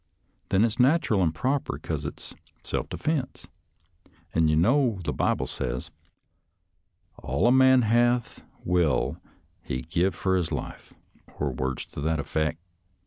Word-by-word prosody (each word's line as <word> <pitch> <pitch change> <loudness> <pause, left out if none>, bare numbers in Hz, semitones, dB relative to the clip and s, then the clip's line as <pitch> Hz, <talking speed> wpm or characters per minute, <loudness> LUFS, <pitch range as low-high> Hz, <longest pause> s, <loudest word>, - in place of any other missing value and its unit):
Then 100 +4 +4
it's 115 -1 -2
natteral 125 - +3
an' 85 -3 +2
proper, 130 - -1
'cause - - -4
it's - - -7 0.3
self - - -2
defense, 150 -5 -3 0.9
an' 80 0 +3
you 75 - +3
know 115 - +3
the - - -2
Bible - - 0
says, 65 0 -4 0.6
' 90 0 -45
All 70 - 0
a 120 - +6
man 130 -1 +6
hath 120 +1 +1 0.2
will 90 -3 +1 0.4
he 65 -1 -4
give 85 +2 0
fur 95 +1 +1
his 85 -3 -1
life,' - - -6 0.5
or 70 -1 -1
words 65 +1 -3
to - - -8
that 80 +2 0
effeck. 80 +2 -1
95 Hz, 140 wpm, -26 LUFS, 80-120 Hz, 0.9 s, a